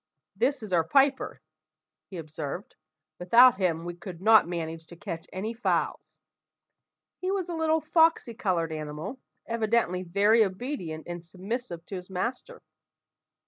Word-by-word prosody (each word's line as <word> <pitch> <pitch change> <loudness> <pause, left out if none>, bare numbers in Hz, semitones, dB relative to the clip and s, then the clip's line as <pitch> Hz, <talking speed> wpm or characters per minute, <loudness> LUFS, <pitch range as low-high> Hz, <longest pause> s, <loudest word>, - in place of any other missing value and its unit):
"This 280 -4 0
is 205 -4 -6
our 165 -2 +4
piper," 270 - +2 0.7
he 190 - -7
observed; 155 +2 -6 0.5
"without 235 +7 +7
him 170 -3 0
we 175 - -4
could 175 0 -9
not 220 0 +6
manage 165 -2 -5
to 170 - -12
catch 165 -1 -6
any 210 +5 -3
fowls." 235 - -1 1.0
He 370 - -2
was 385 -3 -1
a - - -3
little 320 -1 +1
foxy 320 -5 +3
coloured 185 -9 -1
animal, 155 - -6 0.3
evidently 225 -5 +1
very 200 +5 +4
obedient 190 - -4
and 175 -1 -6
submissive 185 0 -5
to 195 - -7
his 180 +1 -10
master. 250 - -4
190 Hz, 140 wpm, -28 LUFS, 170-245 Hz, 1.0 s, without